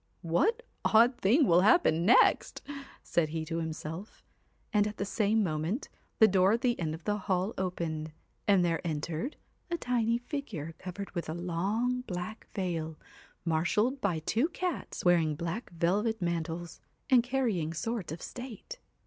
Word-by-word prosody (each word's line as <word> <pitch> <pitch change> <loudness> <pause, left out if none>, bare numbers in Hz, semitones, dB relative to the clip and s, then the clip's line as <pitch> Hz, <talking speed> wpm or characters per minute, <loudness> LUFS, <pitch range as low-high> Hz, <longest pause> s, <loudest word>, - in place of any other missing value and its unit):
'What 365 - +1 0.2
odd 235 +3 +5
thing 255 +10 +4
will 175 -4 +5
happen 185 - +4
next?' 240 - +4 0.4
said 165 -3 +1
he 160 0 -3
to 165 +1 -3
himself; 160 +4 -6 0.5
and 210 -1 +4
at 210 0 -6
the 200 - -1
same 215 +1 +2
moment, 165 - -2 0.3
the 220 - +8
door 190 +1 +4
at 230 - 0
the 250 -1 +3
210 175 - -4
end 155 - -2
of 165 - -13
the 210 +3 0
hall 190 +2 +1
opened, 165 -4 -3 0.4
and 195 -3 +5
there 165 -1 0
entered 160 - -3 0.3
a 340 - -1
tiny 235 -5 +1
THE 245 - -15
figure 205 - -5
covered 190 +2 -6
with 170 -3 -4
a 160 - -3
long 200 +9 -1
black 180 +4 -5
veil, 165 -5 -2 0.5
marshalled 180 - +1
by 185 -5 +1
two 225 - 0
cats 360 - -4
wearing 165 -4 +4
black 170 +8 -4
velvet 195 +7 0
mantles, 170 -1 -3 0.3
and 250 -2 +7
carrying 235 -11 0
swords 195 +1 -3
of 160 - -6
state. 255 - -8
185 Hz, 160 wpm, -30 LUFS, 165-230 Hz, 0.5 s, the